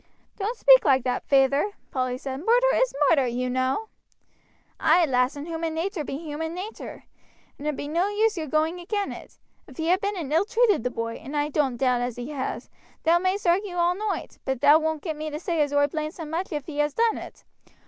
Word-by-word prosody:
"Don't 435 +5 -2
speak - - +7
like 265 -4 +3
that, 250 -1 -2
feyther," 275 +8 +3 0.2
Polly 255 -1 -1
said; 265 0 -5
"murder 485 +4 +4
is - - +2
murder, 275 -6 +4
you 250 +1 -2
know." 260 - -1 0.9
"Ay, 330 +2 +4
lass, 250 -1 +1
and 285 +1 -6
human 325 -1 -3
natur 345 0 -2
be 270 - -5
human 320 +1 -5
natur, 400 +5 -7 0.6
and 290 - -5
it 300 - -1
be 285 - -5
no 340 +6 +1
use 430 +1 +1
your 320 -3 -4
going 315 +5 0
agin 400 +3 -2
it. - - -11 0.3
If 265 - -15
he 325 +1 +1
ha 365 - +5
been 405 +1 -3
and 305 -4 -4
ill 335 +5 +3
treated 445 - +2
the 250 - 0
boy, 230 -1 -4
and 295 +2 -6
I 290 0 0
don't 275 -5 0
doubt 250 -1 +2
as 245 -1 -2
he 245 +4 -6
has, 270 -3 -4 0.4
thou 335 +2 +4
may'st 375 +3 -1
argue 360 +2 +1
all 345 0 +2
noight, 420 +1 -4
but 265 -2 -2
thou 295 +2 +7
won't 315 -1 -2
get 320 -4 -3
me 310 +1 -4
to 300 0 -5
say 335 -2 -1
as 290 -1 +1
oi 285 0 +4
blames 305 +2 -4
him 320 -3 -7
much 345 +4 -3
if 295 -3 -3
he 295 -2 -6
has 295 -1 +1
done 460 -1 +2
it. - - -11
310 Hz, 225 wpm, -25 LUFS, 275-365 Hz, 0.9 s, speak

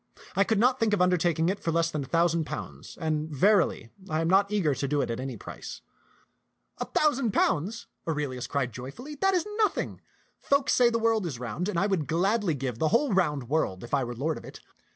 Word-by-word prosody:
I 195 - +5
could 220 +2 0
not 250 +4 +3
think 220 -2 +2
of 200 - +2
undertaking 175 -2 +2
it 200 +2 -1
for 165 - -1
less 165 0 +1
than 150 -2 -2
a - - -9
thou 170 0 +3
sand 165 -2 0
pounds; - - -7
and 155 -2 -1
verily, 165 - +2 0.2
I 155 +1 0
am 165 - 0
not 195 +3 +4
eager 185 -9 +2
to 140 - -2
do 145 +1 0
it 130 - 0
at 115 - -3
any 130 -2 -5
price." - - -9 1.0
"A - - -2
thousand 275 -8 +1
pounds!" 190 +8 0 0.2
Aurelius 145 -6 -2
cried 135 -5 -1
joyfully, 135 - -8
"that 385 0 +3
is 355 - +1
nothing. 430 - 0 0.4
Folk 280 0 +2
say 245 -1 +5
the 230 - 0
world 225 -4 +1
is 140 -7 -5
round, 125 - -3
and 180 - -2
I 195 - +2
would 190 -7 0
gladly 190 +1 +1
give 125 -4 -4
the 160 - +2
whole 235 - +2
round 150 -9 +1
world 125 -10 -1
if 120 - -10
I 140 -2 +3
were 120 0 -5
lord 150 +6 -2
of - - -15
it. - - -10
165 Hz, 225 wpm, -27 LUFS, 145-210 Hz, 1.0 s, I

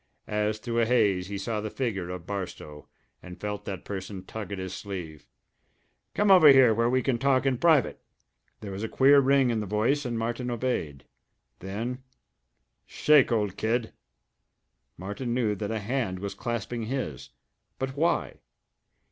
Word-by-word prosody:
As 105 0 -1
through 115 +1 -2
a 115 - +3
haze 100 -7 +2
he 100 0 -4
saw 105 +2 -3
the 110 - -4
figure 100 -8 -3
of 90 -2 -6
Barstow, 90 -6 -6 0.3
and 90 -1 -11
felt 105 0 -5
that 95 -3 -6
person 95 -1 -6
tug 105 -2 -7
at 100 - -4
his 95 0 -5
sleeve. 85 -7 -7 0.9
"Come 205 -1 +3
over 180 -5 +8
here, 135 -5 +7
where 115 +2 +1
we 130 0 +1
can 125 -2 0
talk 135 -1 +2
in 130 -3 +1
private!" 160 -7 +3 0.6
There 100 - -6
was 95 +1 -6
a 110 - -3
queer 140 +2 +6
ring 135 -2 +3
in 115 - 0
the 105 - -4
voice 110 +9 +1
and 120 -3 -3
Martin 120 +2 -2
obeyed. 115 - -3 0.5
Then 115 +7 -5 0.9
"Shake, 150 -5 +4
Old 105 -5 0
Kid!" 115 +1 -1 1.0
Martin 105 +7 -4
knew 115 -4 +1
that 105 0 -4
a 110 - -2
hand 110 -3 -2
was 100 +1 -5
clasping 120 -1 -4
his. 115 - -4 0.5
But 130 0 -4
why? 165 +4 0
110 Hz, 165 wpm, -27 LUFS, 100-125 Hz, 1.0 s, over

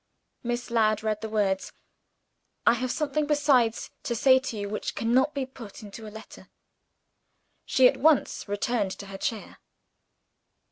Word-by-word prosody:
Miss 240 0 -3
Ladd 215 -2 +2
read 215 -1 -1
the 220 - -4
words: 200 -3 0 0.9
"I 235 - +6
have 255 +1 -2
something 300 +1 -1
besides 280 -6 +2
to 235 - -2
say 260 +3 +5
to 260 -4 -5
you 205 0 -3
which 210 +1 -4
cannot 255 +6 +2
be 275 -2 -1
put 235 -6 -11
into 215 +2 -9
a - - -6
letter." 220 +1 -12 1.2
She 260 -1 +5
at - - +1
once 300 -6 +2
returned 205 +1 0
to 200 - -8
her 195 0 -9
chair. 220 0 -4
230 Hz, 150 wpm, -27 LUFS, 215-260 Hz, 1.2 s, I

